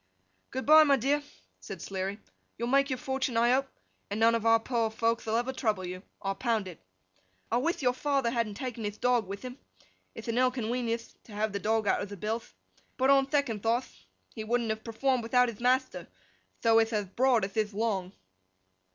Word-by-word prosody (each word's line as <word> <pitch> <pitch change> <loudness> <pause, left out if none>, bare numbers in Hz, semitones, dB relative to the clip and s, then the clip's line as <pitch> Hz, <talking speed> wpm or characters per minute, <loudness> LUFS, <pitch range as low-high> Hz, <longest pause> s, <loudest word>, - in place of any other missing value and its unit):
'Good 260 +1 -4
bye, 310 +1 +9
my 285 -2 +4
dear!' 275 +4 +1 0.4
said - - -8
Sleary. 195 +1 -4 0.4
'You'll 235 +1 -2
make 275 +2 +3
your 260 - -1
fortun, 265 -2 -2
I 235 +1 +4
hope, 270 +2 +2 0.4
and 205 +2 -3
none 230 +1 +5
of 230 -1 0
our 225 0 +6
poor 230 -1 0
folkth 230 +1 -1
will 220 - 0
ever 245 +2 -1
trouble 215 -7 -1
you, 180 +1 -6 0.2
I'll 195 0 0
pound 225 -2 -1
it. 175 -4 -10 0.7
I 235 - +3
with 300 +4 -1
your 250 -1 +3
father 275 -2 0
hadn't 230 -4 -1
taken 245 -1 -5
hith 210 0 -4
dog 245 -4 +2
with 200 +3 -7
him; 255 +2 -8 0.6
ith - - -9
a 230 - -1
ill 255 +1 +4
conwenienth 235 -1 -3
to 220 - -13
have 210 0 -1
the 200 - -2
dog 220 +2 +1
out - - +2
of 200 - -5
the 205 - -8
billth. 220 +4 -4 0.4
But 265 +1 +4
on 270 -1 +4
thecond 275 -8 0
thoughth, 225 - -2 0.3
he 220 - -5
wouldn't 230 0 0
have 220 0 -4
performed 250 +3 0
without 250 +2 +3
hith 220 - -9
mathter, 250 +2 +1 0.6
tho 225 -1 +5
ith 225 0 +1
ath 205 -3 -3
broad 250 -4 +3
ath 195 - -9
ith 215 -1 0
long! 200 -3 -2
230 Hz, 205 wpm, -29 LUFS, 215-255 Hz, 0.7 s, bye